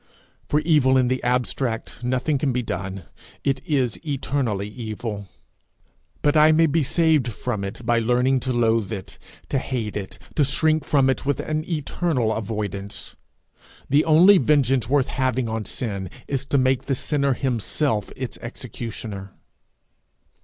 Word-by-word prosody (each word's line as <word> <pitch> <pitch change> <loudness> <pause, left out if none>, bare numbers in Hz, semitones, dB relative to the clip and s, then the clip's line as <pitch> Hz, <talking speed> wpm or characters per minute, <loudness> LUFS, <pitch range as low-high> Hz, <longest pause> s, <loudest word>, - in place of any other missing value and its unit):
For 150 - +2
evil 145 -5 +4
in 125 -1 +3
the 130 0 0
abstract, 125 -1 -1
nothing 130 +4 0
can 135 0 +1
be 125 0 -1
done. 95 -1 -4 0.4
It 135 -1 0
is 135 -6 0
eternally 130 - -1
evil. 110 -2 -5 1.0
But 145 0 +3
I 155 +1 +7
may 160 +1 +5
be 160 +1 +2
saved 155 -2 +2
from 110 -2 -3
it 105 +4 -6
by 120 0 +3
learning 125 +3 +2
to 130 +1 -2
loathe 115 -3 +1
it, 100 -4 -7 0.3
to 135 - +1
hate 120 -6 -3
it, 100 -2 -5 0.2
to 150 - +3
shrink 155 +2 +1
from 140 -3 +3
it 130 - 0
with 140 0 0
an 155 0 -2
eternal 150 -6 0
avoidance. 105 -2 -4 0.8
The 145 +2 +5
only 175 +5 +7
vengeance 135 -3 +2
worth 140 -1 +2
having 130 -2 0
on 110 -1 -3
sin 100 -6 -4 0.2
is 135 -1 -2
to 140 - +1
make 130 -1 +2
the 135 - 0
sinner 140 +1 +1
himself 120 -2 -1
its 130 -2 -6
executioner. 110 -5 -7
130 Hz, 150 wpm, -23 LUFS, 110-140 Hz, 1.0 s, I